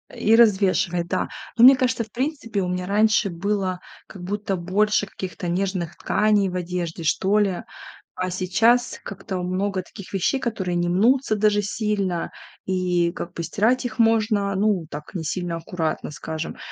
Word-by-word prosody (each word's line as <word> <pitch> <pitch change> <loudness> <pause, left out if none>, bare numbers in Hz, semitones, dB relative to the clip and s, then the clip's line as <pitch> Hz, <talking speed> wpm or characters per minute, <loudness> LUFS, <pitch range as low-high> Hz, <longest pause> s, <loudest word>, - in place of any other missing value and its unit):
и 225 +1 +3
развешивает, 190 -6 +3
да. 185 - -1 0.3
Но 230 - +5
мне 265 +2 +10
кажется, 250 -2 0
в 220 - -16
принципе, 250 -5 -2
у 180 - -1
меня 180 0 -3
раньше 215 +1 +3
было 190 +1 -2 0.3
как 185 - -11
будто 200 +1 -2
больше 205 +4 +1
каких-то 185 -2 -6
нежных 180 -1 -2
тканей 210 -2 +2
в 180 - -6
одежде, 175 -2 -3
что 190 +6 +2
ли, 195 -4 +1 0.5
а 185 0 -2
сейчас 215 +7 +2
как-то 190 -1 -6
много 185 +1 -1
таких 185 +1 -12
вещей, 195 +8 0
которые 195 -8 -2
не 175 0 0
мнутся 225 +6 +3
даже 210 0 +2
сильно, 205 -4 -2 0.3
и 180 -2 +1
как 175 -1 -6
бы 170 - -4
стирать 220 +10 +1
их 240 - -4
можно, 215 -3 +2
ну, 195 -3 +1
так 150 +4 -8
не 175 -4 -4
сильно 175 +2 -3
аккуратно, 165 -2 -3
скажем. 160 +2 -6
195 Hz, 160 wpm, -23 LUFS, 180-215 Hz, 0.5 s, мне